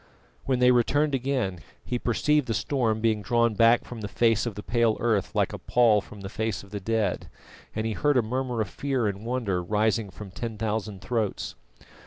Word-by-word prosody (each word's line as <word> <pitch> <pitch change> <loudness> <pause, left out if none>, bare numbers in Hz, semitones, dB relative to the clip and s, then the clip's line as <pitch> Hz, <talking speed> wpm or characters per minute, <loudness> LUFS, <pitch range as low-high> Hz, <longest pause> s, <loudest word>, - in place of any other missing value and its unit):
When 130 -2 +1
they 125 0 +5
returned 145 +5 +2
again, 125 -8 -1 0.3
he 125 - -2
perceived 145 +4 +1
the 115 - -1
storm 115 -6 0
being 110 -2 +2
drawn 115 +3 +2
back 115 +3 +4
from 120 -2 -8
the 105 - -3
face 115 +1 +2
of 110 - -4
the 105 - -7
pale 115 -2 +2
earth 110 -5 0
like - - +1
a - - -5
pall 115 -4 +4
from 105 0 -12
the 95 - -6
face 110 +1 -3
of 100 - -16
the 105 - -4
dead, 110 +1 -1 0.5
and 110 0 -1
he 110 - -1
heard 145 +4 +2
a 125 - +4
murmur 125 0 -2
of 105 - -1
fear 135 -4 -1
and 100 +2 -3
wonder 115 -8 -1
rising 105 +3 0
from 95 +2 -10
ten 110 +3 -5
thousand 105 -2 -3
throats. 110 +1 -2
115 Hz, 205 wpm, -26 LUFS, 105-125 Hz, 0.5 s, they